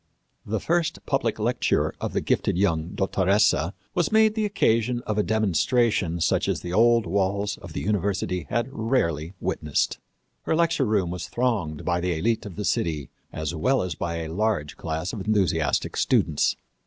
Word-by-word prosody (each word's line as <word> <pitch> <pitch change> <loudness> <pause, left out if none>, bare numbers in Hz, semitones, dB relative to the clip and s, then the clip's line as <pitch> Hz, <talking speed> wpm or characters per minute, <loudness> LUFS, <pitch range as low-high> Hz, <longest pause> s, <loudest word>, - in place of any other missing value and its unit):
The 110 +1 -1
first 170 - -1
public - - 0
lecture - - +1
of - - -3
the - - 0
gifted - - 0
young 85 -4 0
dottoressa 95 -3 +2 0.2
was 175 - 0
made 220 0 +5
the 220 -1 0
occasion 120 - +1
of 110 -1 -1
a - - +5
demonstration 110 - +1
such - - +1
as - - -1
the 90 0 -5
old 115 +2 +4
walls 100 +3 0
of - - -11
the - - -3
university 95 -4 -1
had 120 0 0
rarely 95 - -1
witnessed. 75 -1 -1 0.4
Her - - 0
lecture 165 -4 +2
room 100 -6 +1
was 90 - -5
thronged 110 -12 -1
by 85 -1 +1
the 85 -2 -1
élite 110 +3 0
of 95 - -9
the 105 - -4
city, 80 -6 -1 0.2
as 80 +1 -3
well 130 +11 +1
as 90 -3 -3
by 85 +3 -3
a 80 - -6
large 100 -7 -1
class 80 +2 -4
of 105 -5 -5
enthusiastic 85 -9 +1
students. 75 - +2
100 Hz, 170 wpm, -25 LUFS, 85-115 Hz, 0.4 s, made